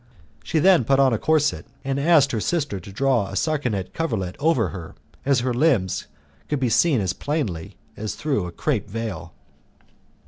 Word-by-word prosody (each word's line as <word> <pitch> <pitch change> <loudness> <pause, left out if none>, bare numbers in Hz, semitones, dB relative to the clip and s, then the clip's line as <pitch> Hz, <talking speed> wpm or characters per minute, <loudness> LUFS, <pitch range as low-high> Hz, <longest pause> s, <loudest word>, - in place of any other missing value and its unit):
She - - -1
then 175 -2 +5
put 135 +4 +2
on 135 -3 +4
a 110 - 0
corset 155 -1 +1 0.2
and 135 0 -1
asked 145 -2 +4
her 115 - -1
sister 145 - -1
to 95 +3 -11
draw 120 -1 +1
a 95 - -7
sarcenet 125 - -1
coverlet 110 - -2
over 135 - +2
her, 85 -1 -8 0.3
as 135 -3 +3
her 125 0 0
limbs 120 - +1 0.4
could 150 - 0
be 130 -2 +1
seen 145 +2 +3
as 95 -2 -1
plainly 120 - -3 0.2
as 110 0 -4
through 135 -12 -1
a - - -7
crape 110 - -2
veil. 110 -6 -5
130 Hz, 175 wpm, -23 LUFS, 100-150 Hz, 0.4 s, then